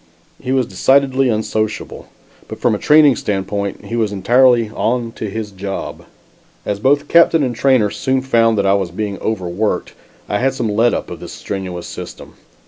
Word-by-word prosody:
He 130 Hz, -, -4 dB
was 130 Hz, -2 st, +2 dB
decidedly 135 Hz, +6 st, +2 dB
unsociable, 110 Hz, -1 st, -3 dB, 0.4 s
but -, -, -8 dB
from -, -, +2 dB
a -, -, -2 dB
training 150 Hz, -3 st, +5 dB
standpoint, 100 Hz, -1 st, -3 dB
he 115 Hz, -, -5 dB
was 110 Hz, -3 st, 0 dB
entirely 120 Hz, +2 st, +3 dB
"on 115 Hz, +1 st, -1 dB
to 110 Hz, -2 st, -6 dB
his 105 Hz, 0 st, -5 dB
job." 95 Hz, 0 st, -6 dB, 0.6 s
As 100 Hz, -1 st, -2 dB
both 145 Hz, +5 st, +2 dB
captain 165 Hz, -2 st, +4 dB
and 125 Hz, -3 st, -2 dB
trainer 115 Hz, -4 st, +2 dB
soon 130 Hz, -1 st, -1 dB
found 115 Hz, -4 st, +2 dB
that 100 Hz, -, +1 dB
I 95 Hz, -, +4 dB
was 95 Hz, -3 st, 0 dB
being 100 Hz, +2 st, -4 dB
overworked, 100 Hz, 0 st, -2 dB, 0.3 s
I 105 Hz, -, -1 dB
had 135 Hz, +1 st, 0 dB
some 115 Hz, -, -2 dB
"let 115 Hz, +3 st, +2 dB
up" -, -, -5 dB
of -, -, -7 dB
this -, -, -9 dB
strenuous 90 Hz, -3 st, -6 dB
system. -, -, -9 dB
110 Hz, 175 wpm, -17 LUFS, 100-130 Hz, 0.6 s, training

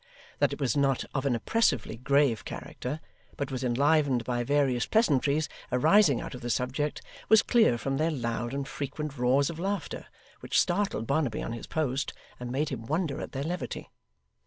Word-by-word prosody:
That -, -, +3 dB
it -, -, -5 dB
was 130 Hz, -6 st, +1 dB
not 135 Hz, -2 st, +2 dB
of 135 Hz, 0 st, 0 dB
an 125 Hz, -, +2 dB
oppressively 130 Hz, -, +1 dB
grave 135 Hz, 0 st, +2 dB
character, 145 Hz, +5 st, -6 dB, 0.4 s
but 140 Hz, -1 st, -3 dB
was 130 Hz, 0 st, -3 dB
enlivened 135 Hz, 0 st, +2 dB
by 120 Hz, 0 st, -1 dB
various 135 Hz, -2 st, +1 dB
pleasantries 150 Hz, -, +2 dB, 0.2 s
arising 155 Hz, -, +5 dB
out -, -, -6 dB
of 125 Hz, -, -8 dB
the 120 Hz, -, -4 dB
subject, 130 Hz, +5 st, -1 dB, 0.3 s
was 220 Hz, 0 st, +7 dB
clear 220 Hz, -, +4 dB
from 135 Hz, +3 st, -2 dB
their 160 Hz, +3 st, +2 dB
loud 120 Hz, -4 st, -2 dB
and 140 Hz, 0 st, -3 dB
frequent 145 Hz, +1 st, -5 dB
roars 135 Hz, +5 st, +3 dB
of 165 Hz, -, -9 dB
laughter, 195 Hz, +2 st, -3 dB, 0.3 s
which -, -, +1 dB
startled 180 Hz, -, 0 dB
Barnaby 140 Hz, -4 st, 0 dB
on 115 Hz, -, -4 dB
his 115 Hz, -, -7 dB
post, 140 Hz, -4 st, -1 dB, 0.3 s
and 125 Hz, 0 st, -5 dB
made 140 Hz, +4 st, 0 dB
him 115 Hz, -4 st, -6 dB
wonder 155 Hz, -1 st, -1 dB
at -, -, -6 dB
their 135 Hz, -, -2 dB
levity. 175 Hz, +3 st, -4 dB
140 Hz, 180 wpm, -28 LUFS, 125-155 Hz, 0.4 s, was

